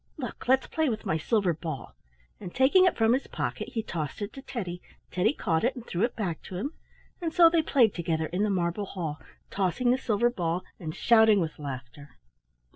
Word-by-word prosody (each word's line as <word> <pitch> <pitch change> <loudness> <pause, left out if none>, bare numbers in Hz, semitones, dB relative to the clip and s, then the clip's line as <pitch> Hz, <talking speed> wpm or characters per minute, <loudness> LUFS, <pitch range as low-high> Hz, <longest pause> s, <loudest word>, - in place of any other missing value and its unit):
Look! 255 -4 -6
Let's 260 +1 +4
play 315 -2 0
with 220 -1 -4
my 160 -5 0
silver 200 0 +1
ball," 155 -5 -6 0.5
and 175 - -8
taking 290 +9 +5
it 365 - +2
from 225 +1 +4
his 265 - -1
pocket - - -4
he 225 - -1
tossed 155 -7 -4
it 205 - -6
to 270 - -9
Teddy. 180 -10 -5 0.3
Teddy 185 +4 +2
caught 165 - -1
it 250 +4 +1
and 245 -2 -8
threw 175 - -3
it 235 +2 +1
back 180 -7 -3
to 185 - -8
him, 275 - -3 0.5
and 330 -2 -1
so 335 0 +6
they 335 -1 +4
played 250 -8 +3
together 165 -2 -1
in 180 +5 -2
the 210 - +2
marble 185 +1 -1
hall, 160 -6 -5 0.3
tossing 195 +6 +1
the 255 - +2
silver 235 +1 +1
ball 175 -4 -2 0.2
and 160 -3 -5
shouting 220 -3 +5
with 160 -4 -3
laughter. 140 0 -8
200 Hz, 205 wpm, -28 LUFS, 170-245 Hz, 0.5 s, so